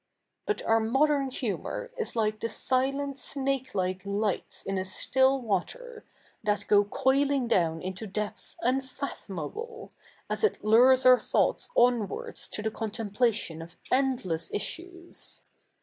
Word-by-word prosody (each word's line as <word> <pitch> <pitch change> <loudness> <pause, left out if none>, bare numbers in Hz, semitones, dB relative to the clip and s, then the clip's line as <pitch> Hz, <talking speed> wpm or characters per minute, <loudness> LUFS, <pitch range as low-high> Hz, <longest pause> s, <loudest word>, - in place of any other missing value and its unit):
But 425 - -1
our 225 0 +3
modern 270 +5 +2
humour 260 - -4
is 460 - -4
like 215 -1 0
the 230 - -1
sile7it 275 +3 -1
snakelike 260 -10 -2
lights 200 0 -2
in 195 -1 -2
a - - -1
still 265 +8 +2
water, 445 - -3 0.4
that 210 -1 0
go 205 -1 +6
coili7ig 270 +4 +1
doivn 165 -6 +1
into 190 +4 -5
depths 210 +1 -5
2i7ifatho77iable, 265 - -4 0.4
as - - -3
it 435 - +2
hwes 250 +5 +6
our 255 0 +8
thoughts - - +1
07nvards 240 -5 +1
to 210 - -5
the 220 - -1
conte77iplatio7i 215 -5 -1
of 170 +1 -11 0.2
endless 245 -12 0
issues. 345 - -6
240 Hz, 125 wpm, -28 LUFS, 205-275 Hz, 0.4 s, our